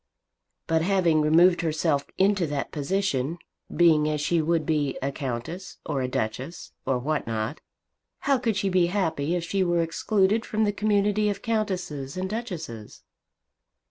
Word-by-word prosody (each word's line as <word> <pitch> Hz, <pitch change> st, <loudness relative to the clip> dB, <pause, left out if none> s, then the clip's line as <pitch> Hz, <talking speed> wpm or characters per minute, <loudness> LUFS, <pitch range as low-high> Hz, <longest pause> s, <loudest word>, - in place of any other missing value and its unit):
"But 160 Hz, 0 st, +1 dB
having 175 Hz, -3 st, +3 dB
removed 170 Hz, +4 st, +5 dB
herself 155 Hz, -3 st, 0 dB
into 195 Hz, -3 st, +3 dB
that 145 Hz, -1 st, -3 dB
position, 155 Hz, -2 st, -1 dB, 0.3 s
being 155 Hz, -3 st, +4 dB
as 150 Hz, 0 st, -1 dB
she 160 Hz, +3 st, +1 dB
would 160 Hz, 0 st, +1 dB
be, 145 Hz, -3 st, 0 dB
a 140 Hz, -, -2 dB
Countess, 135 Hz, +7 st, -5 dB
or 145 Hz, -4 st, -1 dB
a 130 Hz, -, 0 dB
Duchess, 125 Hz, +7 st, -4 dB, 0.2 s
or 130 Hz, -, +2 dB
what 145 Hz, +3 st, -2 dB
not, 115 Hz, +5 st, -3 dB, 0.6 s
how 275 Hz, -2 st, +2 dB
could 225 Hz, -4 st, 0 dB
she 200 Hz, -, 0 dB
be 180 Hz, -2 st, +3 dB
happy 165 Hz, -4 st, 0 dB
if 175 Hz, -, -2 dB
she 190 Hz, +3 st, 0 dB
were 175 Hz, -1 st, +2 dB
excluded 200 Hz, +5 st, +1 dB
from 220 Hz, -1 st, -1 dB
the 205 Hz, -1 st, +1 dB
community 210 Hz, 0 st, +2 dB
of 200 Hz, -1 st, -4 dB
Countesses 185 Hz, -, -2 dB
and 185 Hz, +1 st, -1 dB
Duchesses?" 175 Hz, -, -6 dB
170 Hz, 155 wpm, -26 LUFS, 145-195 Hz, 0.6 s, removed